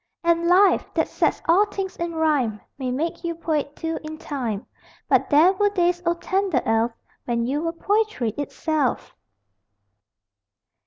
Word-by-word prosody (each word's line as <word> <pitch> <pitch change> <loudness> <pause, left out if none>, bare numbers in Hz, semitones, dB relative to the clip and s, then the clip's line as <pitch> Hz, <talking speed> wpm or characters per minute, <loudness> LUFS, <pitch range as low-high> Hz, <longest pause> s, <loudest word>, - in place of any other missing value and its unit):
And 335 0 +2
Life, 375 +3 +4
that - - +2
sets - - 0
all 380 +6 +5
things 390 -2 -5
in 340 -1 -3
rhyme, 285 -9 +1 0.2
May 260 -1 -2
make 310 +8 -2
you 335 -1 -2
poet, 305 -3 -2
too, 325 0 -3
in 310 0 -7
time 240 -10 -4 0.4
But - - +2
there 320 +6 +6
were 410 +1 +2
days, 355 -3 +1
O 340 - +3
tender 375 -5 0
elf, 225 +1 +2 0.3
When 235 -1 0
you 280 +5 -1
were 330 0 -1
Poetry 410 - 0
itself! 290 +2 -2
325 Hz, 150 wpm, -23 LUFS, 275-355 Hz, 0.4 s, there